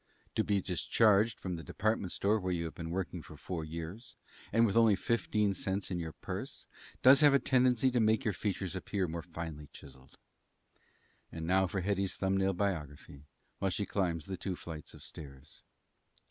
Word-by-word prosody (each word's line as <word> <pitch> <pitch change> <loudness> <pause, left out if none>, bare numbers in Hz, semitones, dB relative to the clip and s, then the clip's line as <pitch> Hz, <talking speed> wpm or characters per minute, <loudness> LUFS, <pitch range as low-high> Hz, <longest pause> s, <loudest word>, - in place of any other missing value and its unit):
To - - +1
be 100 -2 +1
discharged 105 +4 +3
from 90 -2 -4
the 80 - -8
department 105 +2 -1
store 105 +2 +1
where 95 -2 -2
you 85 -1 -1
have 80 - -5
been 80 -1 -6
working 90 -3 -3
four 85 -4 -6
years, 85 +8 -7 0.4
and 115 0 +5
with 100 - 0
only 115 -3 +6
fifteen 105 -1 +1
cents 95 +1 -2
in 90 - -1
your 80 -2 -4
purse, - - -6 0.4
does 135 +3 +8
have 145 -2 +7
a - - +8
tendency 130 -1 +3
to 125 - +2
make 110 -1 +3
your 110 - +1
features 95 -1 -3
appear 95 0 -2
more 85 +1 -4
finely 80 -3 -7
chiselled. 65 -1 -15 1.1
And 80 -1 -5
now 95 +2 +3
for 95 +2 -2
Hetty's 100 0 0
thumb 95 0 0
nail 95 0 +2
biography 75 -7 -4 0.3
while 95 - +1
she 100 +2 -2
climbs 85 -7 -1
the 95 -1 -5
two 90 +2 -3
flights 80 -3 -8
of - - -13
stairs. 70 -1 -11
95 Hz, 180 wpm, -32 LUFS, 85-105 Hz, 1.1 s, does